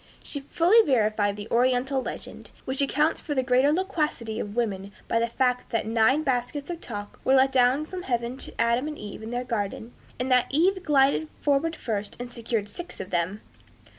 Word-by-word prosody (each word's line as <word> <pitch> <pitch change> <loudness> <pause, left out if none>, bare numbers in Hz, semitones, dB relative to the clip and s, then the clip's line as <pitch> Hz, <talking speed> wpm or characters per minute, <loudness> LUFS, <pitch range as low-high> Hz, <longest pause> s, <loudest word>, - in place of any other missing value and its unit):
She 285 - -4
fully 345 +10 +4
verified 215 - +2
the 205 +1 -7
Oriental 255 +2 +2
legend, - - -7 0.2
which 260 +2 -1
accounts 300 +3 +1
for 295 - -3
the 260 - +2
greater 255 +3 +4
loquacity 300 - -1
of 205 0 -5
women 200 -5 -2 0.2
by 230 - +1
the 230 - +1
fact 250 +1 0
that 230 - -1
nine 230 +7 +3
baskets 275 +3 -1
of 340 -1 -6
talk 205 -3 -7
were 265 - +4
let 265 0 +5
down 260 +3 +3
from 365 +3 -6
heaven 240 -4 -2
to - - -9
Adam 235 +4 +2
and 305 -1 -5
Eve 205 0 -8
in 220 - -7
their 245 +1 -2
garden, 225 0 -3 0.3
and 255 +1 -1
that 250 -1 +4
Eve 370 +6 +2
glided 295 -1 +3
forward 295 +3 +1
first 210 -6 -4
and 245 0 -6
secured 230 -3 -2
six 345 - -9
of 185 - -6
them. 180 +4 -1
250 Hz, 195 wpm, -26 LUFS, 225-285 Hz, 0.3 s, let